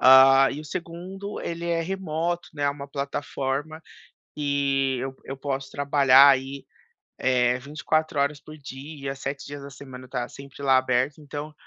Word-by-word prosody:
Hã, 135 +1 +8
e 145 - -5
o - - -10
2º, 185 +5 -6
ele 170 0 -4
é 170 -1 +1
remoto, 175 -1 -2
né, 145 - -4
é 140 - +3
uma 140 0 -7
plataforma 140 +2 -3 0.5
que 140 -2 +1
eu 130 +1 -5
eu 135 - -6
posso 135 -1 -3
trabalhar 140 -1 +6
aí, 135 +1 -1 0.5
eh, 125 -1 +2
24 150 +2 -1
horas 140 +1 0
por 155 +1 -12
dia, 140 0 -7
7 140 +1 -5
dias 145 0 -7
da 140 - -9
semana 130 -2 -10
está 125 -1 -3
sempre 140 0 -11
lá 135 -1 +5
aberto. 130 +2 +1
Então, 150 +1 -6
140 Hz, 160 wpm, -25 LUFS, 135-150 Hz, 0.5 s, Hã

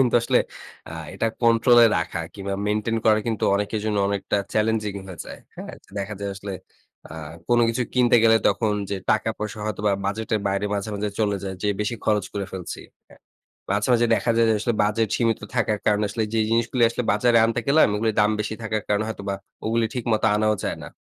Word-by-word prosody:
কিন্তু 125 -2 +3
আসলে - - +3 0.5
আ - - -8 0.2
এটা 115 - 0 0.2
কন্ট্রোলে 115 +1 +6
রাখা 85 +1 -2
কিংবা 100 -1 -4
মেইনটেইন 105 +2 0
করা 110 -1 +5
কিন্তু 110 -2 -1
অনেকের 105 +2 -1
জন্য 105 -1 0
অনেকটা 100 0 -1 0.2
চ্যালেঞ্জিং 110 -1 0
হয়ে 90 - -9
যায়। - - -9 0.2
হ্যাঁ, - - -8 0.2
দেখা 100 +2 -4
যায়, 100 - -3
আসলে 100 0 -7 0.6
আ - - -8 0.4
কোনো 120 0 +4
কিছু 115 +2 0
কিনতে 125 -1 +5
গেলে, 115 -1 +6
তখন 105 +1 +1 0.2
যে 100 - -1
টাকা 110 +1 +2
পয়সা, 105 0 -5
হয়তোবা 105 -1 0
বাজেটের 110 +1 -1
বাইরে 100 +1 -1
মাঝে, 100 +1 -3
মাঝে 105 +1 -2
চলে 105 -2 +1
যায়, 95 -1 -4
যে 105 - +1
বেশি 105 +3 -1
খরচ 105 -3 +2
করে 100 -1 -3
ফেলছি। 90 -2 -6 0.3
হ্যাঁ, - - -19 0.5
মাঝে, 100 +3 0
মাঝে 120 0 +4
দেখা 120 - 0
যায় 115 0 +4
যে, 110 - +3
আসলে 120 +2 0
বাজেট 110 +1 +1
সীমিত 115 -2 +1 0.2
থাকার 110 -2 +1
কারণে 105 0 +3
আসলে 110 +2 -2
যেই 110 - +2
জিনিসগুলো 115 +2 +1
আসলে 120 0 -3
বাজারে 115 +3 +3
আনতে 115 +1 0
গেলাম, 155 +3 +6
ও - - 0
গুলির 110 -2 0
দাম 105 - +4
বেশি 110 +1 -3
থাকার 110 -1 -2
কারণে 105 +1 +1
হয়তোবা 100 -2 -4 0.3
ও - - -2
গুলি 115 0 +2
ঠিকমতো 115 -3 0
আনাও 110 0 +2
যায় - - -2
না। - - -8
110 Hz, 205 wpm, -23 LUFS, 100-115 Hz, 0.6 s, কন্ট্রোলে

